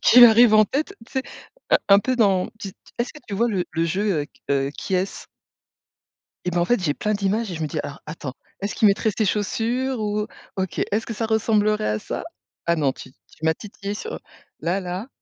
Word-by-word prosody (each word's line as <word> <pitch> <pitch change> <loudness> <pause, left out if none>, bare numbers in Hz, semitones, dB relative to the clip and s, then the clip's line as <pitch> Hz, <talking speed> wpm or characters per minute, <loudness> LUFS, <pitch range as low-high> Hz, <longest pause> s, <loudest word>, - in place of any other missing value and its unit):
qui 245 +1 +9
arrivent 230 -1 +7
en 215 0 +7
tête, 285 +8 -2
tu - - -20
sais? 265 - 0 0.5
Un - - +6
un 200 0 +8
peu 255 +5 0
dans 195 -5 +3
tu 200 - -4 0.3
est-ce 235 - -1
que 300 - -12
tu 200 - -3
vois? 235 +4 +2
Le 190 -5 0
le 165 +1 0
jeu 185 0 +1
heu, - - -7
q - - -30
heu, 135 0 +2
Qui 190 - -3
est-ce? 185 +2 -2 1.2
Et 180 - 0
bah, 175 - +1
en 170 - +3
fait 245 +4 +2
j'ai 150 -5 +1
plein 215 +7 -1
d'images 205 +1 0
et - - -4
je 160 - -5
me 155 - 0
dis: 155 - -3
«Alors 145 - -7
attends, 150 -4 -6 0.3
est-ce 200 +1 -3
qu'il 215 - +5
mettrait 215 +2 +2
ces 220 - +2
chaussures? 235 +6 0
Ou 210 0 -1 0.3
OK, 190 -2 -2
est-ce 215 +2 0
que 230 - -4
ça 225 +1 -2
ressemblerait 215 - +2
à 105 0 0
ça?». - - -5 0.4
Ah 170 - +3
non, 145 -4 +2
tu 130 - -11 0.2
tu 160 - -8
m'as 160 - +4
titillé 200 +2 -6
sur, 450 - -5 0.4
là 175 +4 0
là. 185 +4 -4
205 Hz, 230 wpm, -23 LUFS, 175-225 Hz, 1.2 s, qui